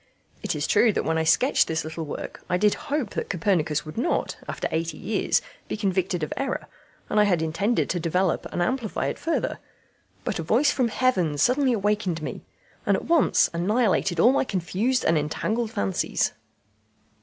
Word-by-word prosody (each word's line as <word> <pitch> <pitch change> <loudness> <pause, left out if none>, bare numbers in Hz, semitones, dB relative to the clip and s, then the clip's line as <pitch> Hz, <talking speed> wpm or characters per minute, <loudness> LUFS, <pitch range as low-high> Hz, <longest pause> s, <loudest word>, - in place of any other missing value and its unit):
It - - -2
is - - -1
true 235 - +4
that - - -1
when 160 0 +1
I - - +1
sketched 155 -2 +3
this 160 0 -1
little 160 +1 -5
work 145 - -7
I 180 - +2
did 210 +2 +3 0.2
hope 285 -7 -1
that - - -4
Copernicus 165 -5 0
would 155 +8 -6
not, 300 - 0
after - - -3
eighty 165 -1 -2
years, 215 +4 0 0.2
be - - -3
convicted 185 -4 0
of 155 - -2
error; 275 - -2 0.4
and 210 - +1
I 210 - +6
had 175 -5 +2
intended 195 +9 0
to 180 - -1
develop 175 +2 0
and 175 - 0
amplify 235 +2 -1
it - - -5
further, 330 - -1 0.6
but - - -2
a - - 0
voice 245 - +3
from 255 -3 +1
heaven 195 - +1
suddenly 255 - +3
awakened 205 -6 0
me, - - -5 0.4
and - - +2
at - - -7
once 335 -1 +4
annihilated 190 -1 +1
all 235 +9 +6
my 275 - +2
confused 215 +5 -1
and 160 -1 +3
entangled 215 +10 -1
fancies." 95 - 0
190 Hz, 180 wpm, -25 LUFS, 165-235 Hz, 0.6 s, I